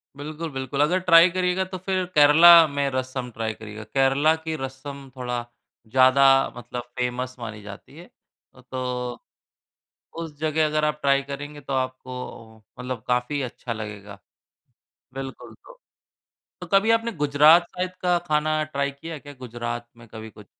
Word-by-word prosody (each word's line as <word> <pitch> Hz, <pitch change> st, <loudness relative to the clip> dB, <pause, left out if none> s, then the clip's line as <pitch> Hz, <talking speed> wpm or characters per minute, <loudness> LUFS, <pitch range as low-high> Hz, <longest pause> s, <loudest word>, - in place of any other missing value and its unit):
बिल्कुल, 155 Hz, +3 st, -6 dB
बिल्कुल। 135 Hz, +1 st, -3 dB
अगर 175 Hz, +5 st, +2 dB
ट्राई 175 Hz, -1 st, +6 dB
करिएगा 180 Hz, +1 st, 0 dB
तो 185 Hz, 0 st, -7 dB
फिर 185 Hz, 0 st, -2 dB
केरल 150 Hz, +2 st, +6 dB, 0.3 s
में 140 Hz, -1 st, +1 dB
रसम 130 Hz, -1 st, -3 dB
ट्राई 110 Hz, -1 st, -3 dB
करिएगा। 110 Hz, 0 st, -10 dB
केरल 135 Hz, +7 st, +2 dB
की 160 Hz, -1 st, -3 dB
रसम 135 Hz, +1 st, -8 dB
थोड़ा 125 Hz, -2 st, -4 dB, 0.4 s
ज़्यादा 130 Hz, +3 st, +4 dB, 0.3 s
मतलब 120 Hz, 0 st, -6 dB
फेमस 125 Hz, +1 st, -3 dB
मानी 105 Hz, -2 st, -7 dB
जाती 100 Hz, +8 st, -12 dB
है। 175 Hz, -, -11 dB, 0.5 s
अ, 125 Hz, -, -16 dB
तो 125 Hz, -1 st, -4 dB, 1.0 s
उस 165 Hz, -3 st, -6 dB
जगह 155 Hz, 0 st, +1 dB
अगर 155 Hz, 0 st, 0 dB
आप 150 Hz, 0 st, -1 dB
ट्राई 140 Hz, 0 st, +3 dB
करेंगे, 145 Hz, +1 st, -8 dB
तो 135 Hz, 0 st, -7 dB
आपको 125 Hz, -4 st, -5 dB, 0.2 s
मतलब 125 Hz, -2 st, -5 dB
काफ़ी 125 Hz, +4 st, 0 dB
अच्छा 120 Hz, -1 st, -6 dB
लगेगा। 105 Hz, -2 st, -8 dB, 1.0 s
बिल्कुल 135 Hz, 0 st, -8 dB
तो -, -, -18 dB, 0.8 s
तो -, -, -7 dB
कभी 200 Hz, +3 st, +3 dB
आपने 230 Hz, +1 st, +1 dB
गुजरात 150 Hz, +1 st, +5 dB
साइड 180 Hz, 0 st, -4 dB
का 180 Hz, -1 st, +2 dB
खाना 155 Hz, 0 st, +1 dB
ट्राई 140 Hz, -2 st, -2 dB
किया 160 Hz, +3 st, -8 dB
क्या, 145 Hz, 0 st, -12 dB
गुजरात 120 Hz, -1 st, -6 dB
में 115 Hz, 0 st, -15 dB
कभी 110 Hz, 0 st, -10 dB
कुछ? -, -, -16 dB
140 Hz, 150 wpm, -24 LUFS, 125-155 Hz, 1.0 s, ट्राई